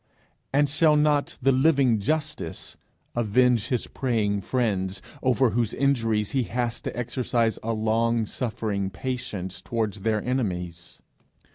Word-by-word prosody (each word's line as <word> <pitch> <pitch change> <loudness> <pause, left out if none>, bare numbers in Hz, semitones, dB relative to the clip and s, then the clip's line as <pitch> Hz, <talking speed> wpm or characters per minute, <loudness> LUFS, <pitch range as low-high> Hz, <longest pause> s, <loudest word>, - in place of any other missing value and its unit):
and 145 +1 +3
shall 150 +2 +4
not 150 -1 +2
the 135 - +5
living 135 -4 +3
Justice 150 - -3 0.4
avenge 120 0 +3
his 125 -4 -1
praying 105 -6 -1
friends 100 -5 -1 0.2
over 130 -2 +3
whose 115 0 0
injuries 115 -7 +1
he 135 - +1
has 120 0 -2
to - - -5
exercise 120 -1 0
a 115 - -2
long 115 +1 +1
suffering 105 -4 -2
patience 105 -6 -4
towards 110 -3 -2
their 110 +2 +1
enemies?' 90 -9 -3
115 Hz, 125 wpm, -25 LUFS, 105-130 Hz, 0.4 s, the